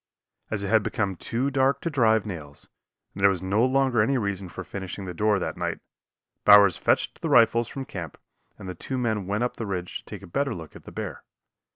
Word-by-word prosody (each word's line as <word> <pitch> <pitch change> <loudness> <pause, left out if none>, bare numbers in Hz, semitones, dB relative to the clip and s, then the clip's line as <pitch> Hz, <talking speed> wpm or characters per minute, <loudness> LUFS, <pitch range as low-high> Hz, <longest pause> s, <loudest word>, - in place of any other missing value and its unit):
As 105 -2 -2
it 100 - -3
had 110 0 +4
become 100 -2 -2
too 125 +9 -2
dark 135 +1 +2
to 170 - -2
drive 110 -6 +3
nails, 75 -8 -7 0.5
and 100 - -7
there 100 - +7
was 95 -2 -2
no 100 +5 +2
longer 130 -2 +3
any 135 +5 +2
reason 100 -4 -3
for - - -7
finishing 95 0 -6
the 90 - -5
door 105 +4 +2
that 95 - -3
night, - - -2 0.7
Bowers 100 -3 +8
fetched - - 0
the - - -2
rifles 115 0 +5
from 135 -1 -6
camp 85 - -7 0.4
and 95 - -9
the 90 - -4
two 130 +9 -5
men 110 -6 -1
went 105 +4 0
up 125 - -2
the 115 - -4
ridge 90 -2 -4
to - - -20
take - - -9
a - - -8
better 140 +10 -1
look 80 -3 -10
at - - -13
the - - -10
bear. - - -6
105 Hz, 225 wpm, -26 LUFS, 95-120 Hz, 0.7 s, Bowers